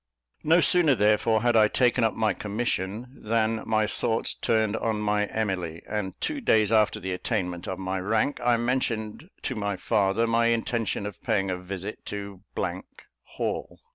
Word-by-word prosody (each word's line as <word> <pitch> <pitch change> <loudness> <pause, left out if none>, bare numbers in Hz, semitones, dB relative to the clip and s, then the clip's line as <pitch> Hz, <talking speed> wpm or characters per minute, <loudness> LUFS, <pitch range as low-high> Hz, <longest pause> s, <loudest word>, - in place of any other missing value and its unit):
No 165 +3 +5
sooner, 165 -7 +5
therefore, 110 +1 +3
had 120 -1 +3
I 110 -1 +6
taken 125 +2 +2
up 110 - +1
my 110 -1 +1
commission, 105 0 -3
than 110 -1 0
my 110 -1 +2
thoughts 110 +1 -1
turned 110 -2 +1
on 110 -2 -1
my 105 0 +1
Emily; 90 -7 -3
and 105 -3 -4
two 300 -2 -2
days 110 - +3
after 110 -2 +3
the 95 0 -3
attainment 90 -3 -3
of 95 - -3
my 95 0 -3
rank, 110 +9 0
I 120 -1 +4
mentioned 120 - -2
to 130 - -2
my 100 -3 -2
father 100 +2 +1
my 115 0 +2
intention 115 -2 -1
of 105 -2 -7
paying 95 -2 0
a 90 - -2
visit 95 +3 -6
to 100 -2 -6 0.8
Hall. - - -4
110 Hz, 165 wpm, -26 LUFS, 100-115 Hz, 0.8 s, I